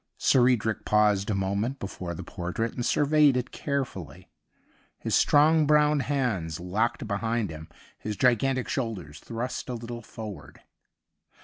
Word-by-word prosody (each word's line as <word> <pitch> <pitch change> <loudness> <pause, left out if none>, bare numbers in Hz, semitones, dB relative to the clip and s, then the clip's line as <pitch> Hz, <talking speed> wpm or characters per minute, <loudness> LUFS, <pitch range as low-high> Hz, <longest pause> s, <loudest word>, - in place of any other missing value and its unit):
Sir 125 -1 +4
Edric 110 -3 0
paused 105 -1 +2
a 105 - +1
moment 100 +7 -1
before 90 -5 -6
the 90 - -6
portrait 90 +6 -3
and 120 - -4
surveyed 145 0 +4
it 125 - -3
carefully^ 135 - -4 0.7
his - - -4
strong 155 +1 +5
brown 150 0 +4
hands 120 - -1
locked 105 +8 -1
behind 110 -1 -1
him, 80 0 -9 0.3
his 105 -2 -5
gigantic 130 +1 +2
shoulders 100 - -4
thrust 120 +3 -5
a 125 - -2
little 120 0 -7
forward. 105 -7 -9
115 Hz, 135 wpm, -27 LUFS, 100-130 Hz, 0.7 s, strong